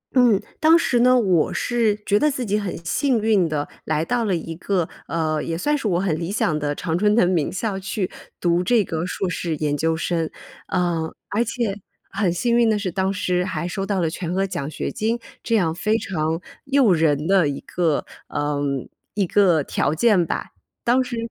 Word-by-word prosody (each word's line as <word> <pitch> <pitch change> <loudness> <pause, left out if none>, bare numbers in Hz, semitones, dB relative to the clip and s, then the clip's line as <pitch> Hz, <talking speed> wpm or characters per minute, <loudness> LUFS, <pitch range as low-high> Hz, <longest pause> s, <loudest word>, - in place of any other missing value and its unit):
嗯， 240 -6 +5 0.2
当 320 +2 +6
时 255 -7 +1
呢， 255 +1 +5
我 185 -8 +2
是 230 -4 +1
觉 205 0 +3
得 300 - +3
自 260 -3 -3
己 210 0 +1
很 200 -3 -4
幸 260 - +1
运 210 -6 +2
地 150 -1 -2 0.2
来 155 +1 0
到 240 +3 0
了 195 -4 +1
一 165 0 -5
个， 175 0 -1 0.2
呃， 155 -2 -1
也 165 - -3
算 295 - +1
是 255 - -2
我 175 -3 +1
很 180 -5 0
理 170 +2 -3
想 170 -7 +1
的 145 -1 -2
常 160 +2 -2
春 210 +2 +3
藤 200 -6 +4
名 170 -5 +1
校 195 +1 -2
去 190 0 -3 0.3
读 175 0 +2
这 225 +3 +3
个 165 -2 -3
硕 190 +1 -2
士 170 -2 -2
研 145 -1 0
究 160 +2 0
生。 165 -1 -1 0.4
嗯， 170 -3 0 0.2
而 220 +3 +1
且 230 -4 -2 0.3
很 195 -2 +1
幸 235 +7 +1
运 235 -1 +4
的 215 - +2
是， 200 -3 -2
当 190 +2 0
时 180 -2 0
还 170 -3 -3
收 195 +2 -3
到 200 -2 0
了 165 -2 +1
全 170 +1 -4
额 195 +1 +2
奖 145 -7 -4
学 - - -4
金， 225 +2 -1 0.2
这 230 - 0
样 170 -7 +2
非 215 +6 +1
常 160 -6 -2 0.3
诱 270 -7 +4
人 155 -3 +2
的 185 -3 +4
一 140 - -4
个 165 -4 0 0.2
呃， 145 0 -2 0.5
一 205 -2 +2
个 175 -5 +3
条 140 +2 0
件 200 0 +4
吧。 - - -3 0.4
当 250 +2 +4
时 250 -1 -5
185 Hz, 220 characters per minute, -22 LUFS, 165-220 Hz, 0.5 s, 当